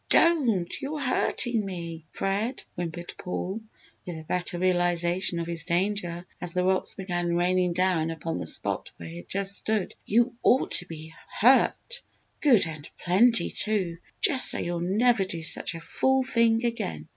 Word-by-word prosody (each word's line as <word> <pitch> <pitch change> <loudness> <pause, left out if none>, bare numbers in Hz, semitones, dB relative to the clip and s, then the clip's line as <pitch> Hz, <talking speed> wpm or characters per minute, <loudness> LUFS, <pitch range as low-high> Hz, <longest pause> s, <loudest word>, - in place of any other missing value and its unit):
"Don't 245 - +3
you're 295 +2 -4
hurtin' 245 -3 0
me, 170 -4 -6
Fred!" 210 +6 -2
whimpered 175 0 -5
Paul, 190 +3 -4 0.4
with 175 -2 -6
a 160 - -8
better 175 +2 -2
realisation 175 0 +1
of 170 - -2
his 165 -1 -3
danger 175 -1 -1 0.2
as 175 -1 -3
the 180 - +2
rocks 190 0 +1
began 175 -3 -2
raining 180 0 +2
down 180 -3 +1
upon 165 0 -4
the - - -5
spot - - -1
where 85 - -9
he 85 +1 -8
had 85 - -11
just 200 +1 -2
stood. 215 -4 -2
"You 240 +3 +2
ought 260 - +3
to 180 - +2
be 160 -1 -9 0.3
hurt 265 - +3 0.4
good 245 - +5
and 155 -2 -8
plenty, 225 +7 +3
too! 190 -6 -1 0.2
Just 285 -11 +4
so - - +3
you'll 175 0 -2
never 210 +5 +2
do 170 -3 -6
such 165 - 0
a - - -6
fool 265 - +1
thing 230 -2 +2
again! 80 - -3
180 Hz, 165 wpm, -27 LUFS, 170-225 Hz, 0.4 s, good